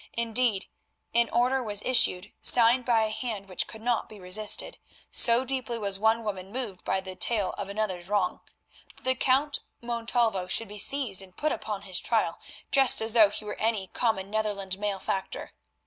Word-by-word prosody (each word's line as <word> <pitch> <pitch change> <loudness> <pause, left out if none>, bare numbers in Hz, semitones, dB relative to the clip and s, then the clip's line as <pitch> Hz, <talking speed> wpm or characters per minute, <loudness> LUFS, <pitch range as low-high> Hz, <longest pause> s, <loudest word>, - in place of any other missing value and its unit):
Indeed, 230 -3 0 0.5
an 235 0 +2
order 250 +3 +1
was 210 -3 -2
issued, 210 -6 +2
signed 240 +1 +5
by 230 -3 +3
a 215 - -2
hand 220 -3 -5
which 185 -2 -3
could 220 0 -11
not 240 -1 -1
be 215 - -12
resisted—so 215 +5 +1
deeply 255 -3 -2
was 200 -3 -1
one 220 +2 +2
woman 195 -3 -5
moved 225 -6 -5
by 190 - -1
the 190 -1 -7
tale 195 +2 0
of 200 -1 -6
another's 200 -4 -3
wrong—that 205 -3 -5
the 260 - +3
Count 270 +3 +1 0.2
Montalvo 235 -5 -1
should 230 +3 0
be 210 0 -4
seized 245 -6 +2
and 185 -1 -13
put 305 +1 0
upon 210 -2 -5
his 190 -3 +3
trial, 220 -8 -1 0.3
just 270 -2 +6
as 220 0 -1
though 220 -4 +6
he 210 - -3
were 210 - -6
any 215 -4 -1
common 205 -5 -1
Netherland 200 -3 -2
malefactor. 195 -2 -4
215 Hz, 170 wpm, -27 LUFS, 195-235 Hz, 0.5 s, just